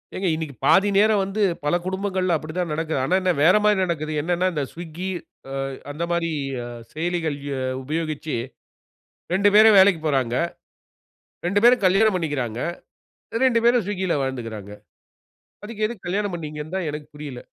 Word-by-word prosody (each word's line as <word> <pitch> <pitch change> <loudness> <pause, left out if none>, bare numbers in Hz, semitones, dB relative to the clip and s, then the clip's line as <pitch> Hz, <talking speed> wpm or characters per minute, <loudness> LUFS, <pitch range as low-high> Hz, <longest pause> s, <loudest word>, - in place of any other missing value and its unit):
ஏங்க, 190 0 -1
இன்னிக்கி 155 -3 -5
பாதி 205 +1 +5
நேரம் 210 +1 +4
வந்து 195 +3 -3 0.2
பல 150 +3 +2
குடும்பங்கள்ல 185 -1 -1
அப்பிடி 155 +1 -5
தான் 175 -3 -1
நடக்குது. 160 -2 -1
ஆனா, 180 - +2
என்ன 185 - +2
வேறமாரி 210 +5 +5
நடக்குது. 155 -3 -2
என்னன்னா, 175 +3 0
இந்த 150 - -1
ஸ்விக்கி 170 +2 -7 0.4
அ - - -5 0.4
அந்த 150 +4 -4
மாரி 170 -1 0 0.3
அ - - -6 0.3
செயலிகள் 165 -2 -2 0.2
அ - - -3 0.2
உபயோகிச்சு 155 0 -3 1.0
2 200 +2 +4
பேரும் 215 -1 +8
வேலைக்குப் 190 -5 +5
போறாங்க. 130 -5 +1 1.1
2 200 +3 +2
பேரும் 240 -2 +6
கல்யாணம் 195 +2 +4
பண்ணிக்கிறாங்க. 140 -9 -2 0.9
2 240 -3 +3
பேரும் 240 -2 +4
ஸ்விக்கில 190 -4 -1
வாழ்ந்துக்கிறாங்க. 115 -6 -5 0.9
அதுக்கு 215 0 -2
எதுக்கு 215 -5 -9
கல்யாணம் 200 +1 -1
பண்ணிங்க 155 -2 -6
னு 165 +4 -7
தான் 185 -4 -1
எனக்கு 150 0 -6
புரியல. 145 -4 -7
175 Hz, 150 wpm, -23 LUFS, 150-195 Hz, 1.1 s, பேரும்